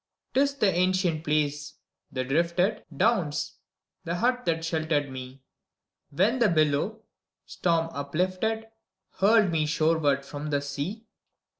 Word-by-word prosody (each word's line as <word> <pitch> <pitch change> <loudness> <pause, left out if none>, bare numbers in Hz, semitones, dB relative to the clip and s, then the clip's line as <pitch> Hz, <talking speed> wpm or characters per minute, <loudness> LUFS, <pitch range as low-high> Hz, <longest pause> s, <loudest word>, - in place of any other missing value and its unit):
'T - - +3
is 280 0 +2
the 210 -9 +2
ancient 180 -3 +1
place, 150 -1 -1 0.4
the 130 - -2
drifted 170 +9 +1
Downs, 180 -11 +1 0.5
the 170 - -2
hut 245 +5 +1
that 165 -1 0
sheltered 155 -4 0
me, 130 0 -9 0.7
When 205 - +1
the 235 -3 +4
billow, 155 +7 +1 0.4
storm 165 -2 0
uplifted. 185 +10 -2 0.5
Hurled 210 -1 +5
me 155 -2 +1
shoreward 150 -3 +2
from 145 +2 -6
the 145 -1 +1
sea 150 +11 -5
165 Hz, 125 wpm, -27 LUFS, 145-200 Hz, 0.7 s, Hurled